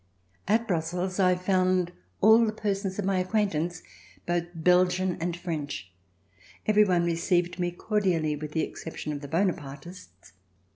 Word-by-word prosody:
At 225 +3 +2
Brussels 180 +1 -2
I 180 -1 +4
found 185 -1 +1 0.3
all 220 +3 +7
the 220 - +1
persons 200 -3 -2
of 205 - -2
my 195 -1 +1
acquaintance, 180 -4 -1 0.4
both 175 0 0
Belgian 180 +2 +3
and 175 0 -2
French. 145 - -5 0.7
Every 210 0 +5
one 175 -3 +2
received 175 +1 0
me 175 0 +1
cordially, 175 -5 0
with 150 0 -7
the 160 - +1
exception 155 -2 -6
of 145 - -6
the 145 - -7
Bonapartists. 160 - -4
180 Hz, 140 wpm, -27 LUFS, 165-190 Hz, 0.7 s, all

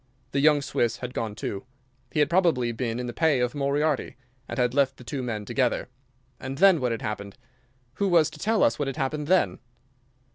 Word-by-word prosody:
The 140 - 0
young 145 0 +4
Swiss 120 -4 0
had 125 0 -6
gone 110 -4 -3
too. 100 -2 -4 0.5
He 150 - +1
had 150 - +4
probably 165 -10 +2
been 115 0 -3
in 125 - -3
the 120 - -5
pay 160 -3 +2
of 125 0 0
Moriarty, 145 +1 0 0.3
and - - -5
had 125 -1 +1
left 140 -1 +2
the - - -12
two 135 +3 -4
men 110 -4 -4
together. 125 +1 0 0.5
And 135 +1 -6
then 185 -2 +5
what 125 -1 0
had 115 - -3
happened? 100 -1 -5 0.6
Who 200 - +1
was 165 -4 +4
to 155 - -13
tell 220 +4 +2
us 115 - +2
what 145 - -1
had 135 - -4
happened 145 +2 -2
then? 185 +1 +2
135 Hz, 210 wpm, -26 LUFS, 120-150 Hz, 0.6 s, then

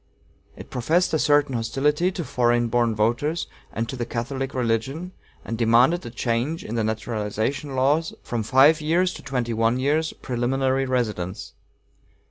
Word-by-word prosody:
It - - -12
professed 160 +9 +1
a 160 - +2
certain 145 -2 +3
hostility 145 +9 +1
to 180 - -3
foreign 120 -3 +1
born 120 -1 +1
voters 120 +10 0 0.3
and 115 0 -3
to 120 - -5
the 125 - -3
Catholic 130 +3 -4
religion, 130 +8 -1 0.3
and 115 0 -4
demanded 120 +10 +4
a - - -6
change 120 +7 -2
in 110 - -5
the 115 -1 0
naturalization 110 +5 -2
laws 145 +5 +2
from 120 -2 -2
a - - -3
five 140 +7 +5
years' 175 +4 +1
to - - -9
a - - -23
twenty 125 -3 -2
one 115 +2 +2
years' 150 +4 +1
preliminary 130 +2 -1
residence. 105 -8 -2
130 Hz, 160 wpm, -24 LUFS, 115-145 Hz, 0.3 s, five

